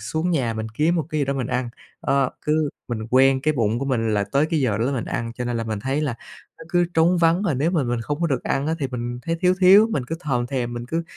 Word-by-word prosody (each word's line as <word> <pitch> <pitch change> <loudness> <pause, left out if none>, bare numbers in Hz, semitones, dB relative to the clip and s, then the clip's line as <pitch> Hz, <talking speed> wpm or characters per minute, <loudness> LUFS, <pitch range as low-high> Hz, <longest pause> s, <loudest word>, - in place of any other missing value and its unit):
xuống 160 +11 -2
nhà 130 -9 0
mình 110 0 -4
kiếm 155 +7 +2
một 160 -5 -1
cái 155 -2 -2
gì - - +2
đó 140 +1 -1
mình 130 -3 -2
ăn, 125 -1 -2 0.3
ơ, 135 -1 +1
cứ 155 0 +1 0.2
mình 110 -3 -4
quen 130 +1 +4
cái 155 +1 +1
bụng 115 -2 +1
của 135 - -3
mình 115 -5 0
là 100 - +1
tới 140 +2 +3
cái 160 -3 +1
giờ 110 -6 +1
đó 115 - +1
là 140 - 0
mình 125 -4 -2
ăn, 115 -1 -3
cho 125 - -4
nên 120 -1 -2
là 115 - -2
mình 110 -2 -3
thấy 135 +6 -1
là 145 -6 -1 0.4
nó 165 - -11
cứ 175 0 +2
trống 170 +2 +4
vắng, 170 +2 +3
và 180 -8 0
nếu 145 +6 +1
mà 170 -5 +1
mình 120 -2 -1
không 145 +6 -4
có 170 - +2
được 135 -6 -1
ăn 140 - -1
á, 160 - 0
thì 140 - -1
mình 120 -1 -4
thấy 165 +4 -2
thiếu 180 0 +3
thiếu, 195 +4 +7
mình 140 - -1
cứ 165 - -3
thòm 125 -6 -1
thèm, 125 -2 -3
mình 120 0 -6
cứ 165 +6 -2
135 Hz, 300 wpm, -23 LUFS, 120-160 Hz, 0.4 s, thiếu